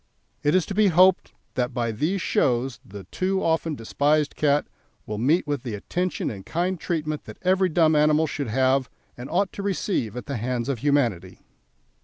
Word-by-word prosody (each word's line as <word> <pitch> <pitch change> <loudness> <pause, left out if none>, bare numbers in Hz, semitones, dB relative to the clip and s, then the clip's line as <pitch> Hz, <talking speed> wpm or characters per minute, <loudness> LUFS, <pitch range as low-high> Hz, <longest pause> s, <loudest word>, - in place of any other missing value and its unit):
It 145 +3 +2
is 185 - +3
to - - -5
be 210 +1 +4
hoped 185 +1 +4 0.2
that 125 -1 -2
by 120 -2 0
these 165 - -1
shows 125 0 0
the 100 0 -10
too 190 +1 -1
often 160 -1 0
despised 145 +5 0
cat 145 -1 +2 0.4
will 105 0 -4
meet 150 +10 +2
with 145 -3 -2
the 120 -5 -5
attention 180 - -2
and 100 -3 -8
kind 175 - -2
treatment 155 -3 -3
that - - -10
every 185 0 +3
dumb 160 -1 +3
animal 150 +1 +4
should 145 -3 -4
have 130 +3 +1 0.3
and 125 +2 -8
ought 185 +3 0
to - - -6
receive 190 - -2
at 125 - -6
the 140 - -4
hands 120 +2 -2
of 135 -4 -1
humanity. 120 -10 0
145 Hz, 185 wpm, -24 LUFS, 125-175 Hz, 0.4 s, be